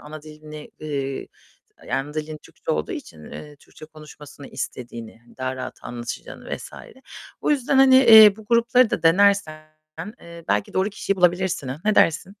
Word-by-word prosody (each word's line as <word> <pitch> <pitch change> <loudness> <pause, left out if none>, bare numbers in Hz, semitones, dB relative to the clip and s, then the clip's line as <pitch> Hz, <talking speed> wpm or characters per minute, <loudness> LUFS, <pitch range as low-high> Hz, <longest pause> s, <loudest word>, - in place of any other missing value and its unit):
ana 150 +1 -11
dilini 155 0 -12
eee, 140 -3 -4 0.6
d - - -8
ana 140 +3 -3
dilin 155 0 -5
Türkçe - - -9
olduğu 75 0 -3
için, 75 -1 -10
eee, 150 -1 -10
Türkçe 150 - -16
konuşmasını 150 -2 -14
istediğini, 115 -2 -8
hani, 120 - -22
daha 130 0 -4
rahat 130 0 -7
anlaşacağını 120 0 -7
vs. - - -11 0.7
Bu - - 0
yüzden, 275 -1 0
hani, 265 -1 +6
eee, 220 -5 +8
bu 220 - -13
grupları 235 +1 +3
da - - -3
denersen, 165 -3 +2 0.5
eee, 170 -1 -13
belki 100 0 -1
doğru 190 +2 +1
kişiyi 200 0 -3
bulabilirsin, 180 -4 0
ha? 130 +4 -6
Ne 215 0 +2
dersin? 165 0 +2
155 Hz, 165 wpm, -22 LUFS, 135-200 Hz, 0.7 s, eee